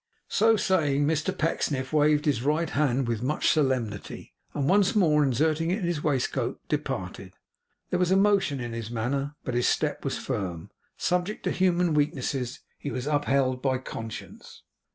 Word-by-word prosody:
So 225 Hz, +1 st, +4 dB
saying, 145 Hz, -8 st, +2 dB
Mr 155 Hz, +1 st, 0 dB
Pecksniff 140 Hz, -5 st, -1 dB
waved 150 Hz, 0 st, +3 dB
his 140 Hz, -6 st, +1 dB
right 155 Hz, +4 st, 0 dB
hand 135 Hz, -3 st, +1 dB
with 115 Hz, -2 st, -1 dB
much 140 Hz, +5 st, +1 dB
solemnity, 130 Hz, -9 st, -1 dB, 0.2 s
and 140 Hz, -2 st, -1 dB
once 195 Hz, +3 st, +3 dB
more 155 Hz, -7 st, +4 dB
inserting 155 Hz, +5 st, +1 dB
it 185 Hz, -, +1 dB
in 210 Hz, -, -5 dB
his 170 Hz, -3 st, -1 dB
waistcoat, 140 Hz, -5 st, -1 dB
departed. -, -, -4 dB, 0.6 s
There 180 Hz, -, +1 dB
was 180 Hz, -1 st, +2 dB
emotion 195 Hz, -7 st, +3 dB
in 120 Hz, -1 st, -5 dB
his 115 Hz, -1 st, -5 dB
manner, 135 Hz, +5 st, -2 dB
but 125 Hz, -, -3 dB
his 120 Hz, 0 st, +2 dB
step 150 Hz, -1 st, 0 dB
was 135 Hz, -, -2 dB
firm. 95 Hz, -10 st, -4 dB, 0.3 s
Subject 180 Hz, +4 st, -1 dB
to -, -, 0 dB
human 180 Hz, -2 st, +2 dB
weaknesses, 135 Hz, -3 st, -1 dB, 0.2 s
he 145 Hz, -, -4 dB
was 125 Hz, -2 st, -4 dB
upheld 140 Hz, -3 st, +1 dB
by 130 Hz, -1 st, +1 dB
conscience. 115 Hz, -3 st, -8 dB
145 Hz, 160 wpm, -27 LUFS, 130-165 Hz, 0.6 s, So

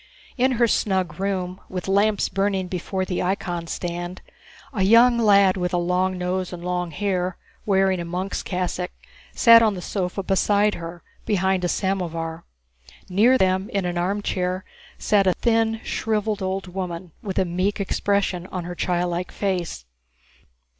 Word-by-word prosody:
In 260 Hz, +1 st, +2 dB
her 235 Hz, -1 st, +3 dB
snug 185 Hz, -7 st, 0 dB
room, 190 Hz, -1 st, -2 dB
with 185 Hz, 0 st, -5 dB
lamps 200 Hz, +2 st, +2 dB
burning 195 Hz, -1 st, 0 dB
before 185 Hz, +1 st, -3 dB
the 180 Hz, -, -2 dB
icon 175 Hz, -2 st, -2 dB
stand, 175 Hz, +1 st, -5 dB, 0.5 s
a 200 Hz, -, -1 dB
young 235 Hz, +5 st, +6 dB
lad 200 Hz, -4 st, +5 dB
with 180 Hz, 0 st, -1 dB
a -, -, +2 dB
long 180 Hz, +2 st, 0 dB
nose 180 Hz, 0 st, -2 dB
and 175 Hz, -1 st, -7 dB
long 180 Hz, -1 st, -1 dB
hair, 185 Hz, +1 st, -1 dB, 0.3 s
wearing 190 Hz, -2 st, +3 dB
a -, -, -3 dB
monk's 180 Hz, +3 st, -3 dB
cassock, 180 Hz, -1 st, -2 dB, 0.5 s
sat 230 Hz, -1 st, +8 dB
on 215 Hz, -3 st, +3 dB
the -, -, -5 dB
sofa 190 Hz, 0 st, -2 dB
beside 205 Hz, +2 st, +2 dB
her, 170 Hz, 0 st, -8 dB, 0.2 s
behind 190 Hz, -2 st, +1 dB
a -, -, +2 dB
samovar. 165 Hz, -4 st, -2 dB, 0.6 s
Near 225 Hz, +8 st, +5 dB
them, 190 Hz, +1 st, +1 dB
in 200 Hz, -5 st, -1 dB
an 175 Hz, 0 st, -1 dB
armchair, 185 Hz, -1 st, -1 dB, 0.3 s
sat 200 Hz, -2 st, +2 dB
a 185 Hz, -, +5 dB
thin, 225 Hz, -1 st, +1 dB
shriveled, 215 Hz, -2 st, -1 dB
old 190 Hz, +1 st, -2 dB
woman, 180 Hz, -2 st, -5 dB
with 195 Hz, -3 st, -5 dB
a 190 Hz, -, +3 dB
meek 185 Hz, +4 st, -1 dB
expression 195 Hz, -2 st, 0 dB
on 185 Hz, -2 st, -5 dB
her 175 Hz, +1 st, -5 dB
childlike 175 Hz, 0 st, -1 dB
face. 180 Hz, -, -2 dB
185 Hz, 155 wpm, -23 LUFS, 180-200 Hz, 0.6 s, sat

